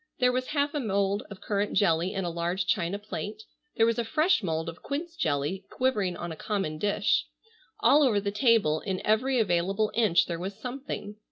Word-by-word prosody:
There 250 -1 +3
was 255 0 -1
half 285 -1 0
a 295 - -1
mould 200 -3 0
of 200 -2 -10
currant 205 0 -1
jelly 170 -2 +2
in 190 -1 -1
a - - -1
large 175 +2 -1
china 180 +2 0
plate, 210 +1 -6 0.3
there 225 - +4
was 230 +1 +1
a - - +1
fresh 310 +9 +2
mould 160 -3 -2
of 165 +1 -7
quince 325 +4 -4
jelly 155 - -1
quivering 210 -9 0
on 175 - -5
a - - -5
common 175 -4 -3
dish. 205 +1 +1 0.5
All 295 - +6
over 240 -8 +4
the 200 0 -2
table 210 - +3
in 190 0 -3
every 250 +5 +2
available 195 +2 +1
inch 215 -7 +3
there 170 -1 -4
was 190 +3 -5
something. 250 -5 -6
205 Hz, 195 wpm, -28 LUFS, 180-235 Hz, 0.5 s, All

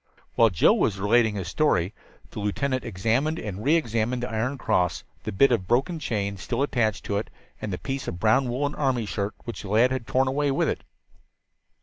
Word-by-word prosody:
While 115 -1 +5
Joe 90 - +4
was 100 -2 +1
relating 110 +2 +3
his 95 -4 -4
story 95 - +1 0.4
the - - -6
lieutenant 130 +6 -1
examined 120 - 0
and 105 - -5
re 150 +6 +4
examined 120 -4 0
the 125 - -3
iron 120 +5 -1
cross, 90 - 0 0.2
the - - -2
bit 130 +8 +4
of 95 -7 0
broken 140 +8 +1
chain 100 -7 -2
still 120 +7 -2
attached 110 -7 0
to 100 - -1
it, 105 - -3 0.3
and 105 - -3
the 90 - -2
piece 135 +4 -4
of 85 - -4
brown 115 +5 +3
woolen 140 +4 -1
army 130 -6 0
shirt 100 0 -3
which 120 - -6
the 100 - -8
lad 115 +5 +4
had 130 -3 -3
torn 130 +1 +2
away 145 +2 +1
with 135 - +1
it. - - -3
115 Hz, 205 wpm, -25 LUFS, 105-135 Hz, 0.4 s, While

